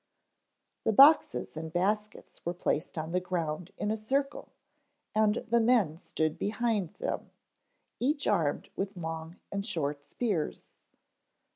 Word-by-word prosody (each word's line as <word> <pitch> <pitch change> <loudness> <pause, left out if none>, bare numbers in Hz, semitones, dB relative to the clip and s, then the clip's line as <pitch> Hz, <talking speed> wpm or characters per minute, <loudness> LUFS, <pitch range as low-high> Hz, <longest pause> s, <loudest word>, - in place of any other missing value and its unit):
The 220 - +2
boxes 270 - +6
and 160 0 -5
baskets 210 +5 -2
were 175 +1 -2
placed 160 -2 -1
on 160 +1 -3
the 180 - +2
ground 175 -2 -3
in 210 - -1
a - - +1
circle 275 +6 -1 0.6
and 215 +1 +2
the 235 +1 +3
men 220 -9 +3
stood 155 -2 -2
behind 215 -4 0
them, - - -3 0.7
each 285 +3 +1
armed 165 -8 +1
with 195 0 -3
long 160 0 -5 0.2
and 200 0 -2
short 145 -8 -2
spears. 205 -11 -2
190 Hz, 130 wpm, -30 LUFS, 160-220 Hz, 0.7 s, boxes